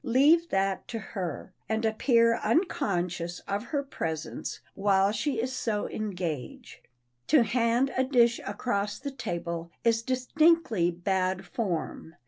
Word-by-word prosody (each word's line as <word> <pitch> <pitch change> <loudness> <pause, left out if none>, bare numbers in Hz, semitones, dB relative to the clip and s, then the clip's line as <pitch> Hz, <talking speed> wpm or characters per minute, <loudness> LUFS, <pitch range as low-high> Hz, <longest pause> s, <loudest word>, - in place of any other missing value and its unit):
Leave 295 +7 +4
that 195 0 0
to 235 - -4
her, 185 -4 -5 0.2
and 220 +1 0
appear 230 +1 +3
unconscious 180 - 0
of 200 +3 -3
her 280 +3 -2
presence 160 - -4
while 195 0 +3
she 230 +4 -1
is 255 +3 -2
so 225 -4 -1
engaged. 190 - -5 0.5
To 300 -5 +5
hand 235 +3 +1
a 260 - +3
dish 240 -3 +3
across 205 -4 -2
the 280 +1 -5
table 170 -8 -4
is 230 -1 +3
distinctly 255 - +2
bad 185 +1 -1
form. 175 -4 -4
220 Hz, 125 wpm, -28 LUFS, 185-255 Hz, 0.5 s, To